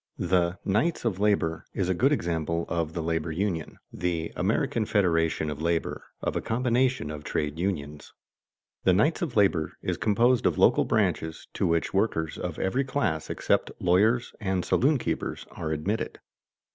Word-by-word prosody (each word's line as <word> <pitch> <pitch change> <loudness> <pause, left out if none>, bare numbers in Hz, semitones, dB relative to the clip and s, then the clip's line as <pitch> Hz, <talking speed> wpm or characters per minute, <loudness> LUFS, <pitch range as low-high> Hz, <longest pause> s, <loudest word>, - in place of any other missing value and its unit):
The 90 0 +1
"Knights 120 - +1
of 100 -5 0
Labor" 100 -6 +1
is 95 - 0
a 95 - +2
good 130 +10 +3
example 85 - -1
of 85 -2 -2
the 85 - -3
labor 80 0 -1
union, 85 -2 -2 0.2
the 85 -2 -2
"American 115 - 0
Federation 80 -7 +1
of 75 +1 -6
Labor" 85 0 -1 0.2
of - - -1
a - - 0
combination 125 - +1
of 75 -1 -7
trade 75 +1 -2
unions. 75 -6 -3 0.7
The 95 - +5
Knights 150 - +2
of 160 -8 -3
Labor 95 -6 +2
is - - -1
composed 120 +4 +3
of - - 0
local - - +5
branches 80 0 0
to - - 0
which 85 -1 0
workers 80 -6 0
of - - -4
every 125 +9 0
class 135 - -1
except - - +1
lawyers 105 +7 +2
and 95 -3 -1
saloon 140 +3 +3
keepers - - -3
are 80 - -5
admitted. 95 +9 -2
90 Hz, 160 wpm, -27 LUFS, 80-110 Hz, 0.7 s, The